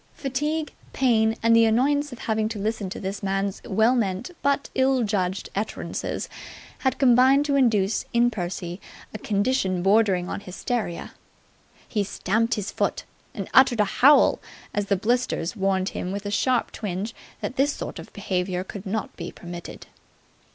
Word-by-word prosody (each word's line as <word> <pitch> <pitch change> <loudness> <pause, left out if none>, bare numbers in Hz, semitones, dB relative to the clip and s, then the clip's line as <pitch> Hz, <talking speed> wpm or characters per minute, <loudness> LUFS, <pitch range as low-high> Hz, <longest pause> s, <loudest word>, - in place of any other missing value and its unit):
Fatigue, 295 +3 -2 0.2
pain 225 -4 +3
and 230 0 +5
the 230 0 +6
annoyance 285 +6 +2
of 245 - -8
having 220 -1 -1
to 220 - -5
listen 210 -1 -2
to - - -6
this 195 +1 -4
man's 195 0 -1
well 220 +5 +3
meant 200 - -1
but 280 0 +1
ill 265 -1 +2
judged 195 -3 -1
utterances 210 +2 -3 0.5
had 265 - 0
combined 265 +2 +5
to 285 -1 +1
induce 220 -6 +2
in 240 +1 +3
Percy 175 -2 -5 0.3
a 215 - -5
condition 200 -4 0
bordering 195 -3 +3
on - - -4
hysteria. 200 0 -4 0.7
He 210 -3 0
stamped 220 +5 0
his 210 -3 -4
foot, - - -1 0.3
and - - -4
uttered 250 -3 +6
a 210 - +5
howl 275 +8 +5 0.3
as 205 -1 -1
the 200 - +3
blister 240 0 0
warned 195 -2 0
him 180 - -4
with 200 +1 -5
a 205 - -3
sharp 250 +3 +1
twinge 205 +1 -4 0.3
that - - -4
this 280 +2 +2
sort - - -6
of - - -10
behaviour 180 -1 -2
could 195 +1 -8
not 215 +3 -3
be 170 -1 -6
permitted. 175 0 -9
215 Hz, 160 wpm, -25 LUFS, 195-250 Hz, 0.7 s, the